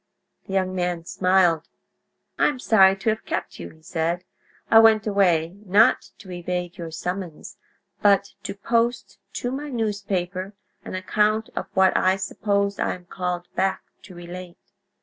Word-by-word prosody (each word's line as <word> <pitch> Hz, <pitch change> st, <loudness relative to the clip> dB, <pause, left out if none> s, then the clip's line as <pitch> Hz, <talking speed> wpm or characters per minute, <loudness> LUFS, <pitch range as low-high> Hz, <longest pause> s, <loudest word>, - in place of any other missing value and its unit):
The 195 Hz, -, -6 dB
young 185 Hz, -1 st, 0 dB
man 175 Hz, -2 st, -2 dB
smiled. 180 Hz, -3 st, +2 dB, 0.7 s
"I -, -, +5 dB
am 290 Hz, -, -1 dB
sorry 195 Hz, -6 st, +5 dB
to 195 Hz, +3 st, -1 dB
have 220 Hz, -, -4 dB
kept -, -, -4 dB
you," 85 Hz, -1 st, -7 dB
he 160 Hz, -, -20 dB
said. 170 Hz, +2 st, -2 dB, 0.5 s
"I 225 Hz, -, +9 dB
went 220 Hz, -1 st, +5 dB
away, 180 Hz, -5 st, +2 dB
not 205 Hz, +2 st, +4 dB
to 185 Hz, -, -12 dB
evade 175 Hz, 0 st, -4 dB
your 165 Hz, -1 st, -5 dB
summons, 180 Hz, 0 st, -6 dB, 0.4 s
but 200 Hz, -1 st, +3 dB
to -, -, -6 dB
post 230 Hz, +3 st, -1 dB
to 245 Hz, -, -3 dB
my 290 Hz, +3 st, -4 dB
newspaper 200 Hz, -5 st, -3 dB, 0.3 s
an -, -, -6 dB
account 210 Hz, +3 st, 0 dB
of -, -, -3 dB
what 190 Hz, 0 st, +4 dB
I 185 Hz, 0 st, +3 dB
suppose 200 Hz, +1 st, -1 dB
I -, -, 0 dB
am 180 Hz, -1 st, -15 dB
called 180 Hz, 0 st, -3 dB
back 190 Hz, 0 st, 0 dB, 0.2 s
to 185 Hz, -1 st, -13 dB
relate." 175 Hz, 0 st, -9 dB
190 Hz, 155 wpm, -24 LUFS, 175-205 Hz, 0.7 s, I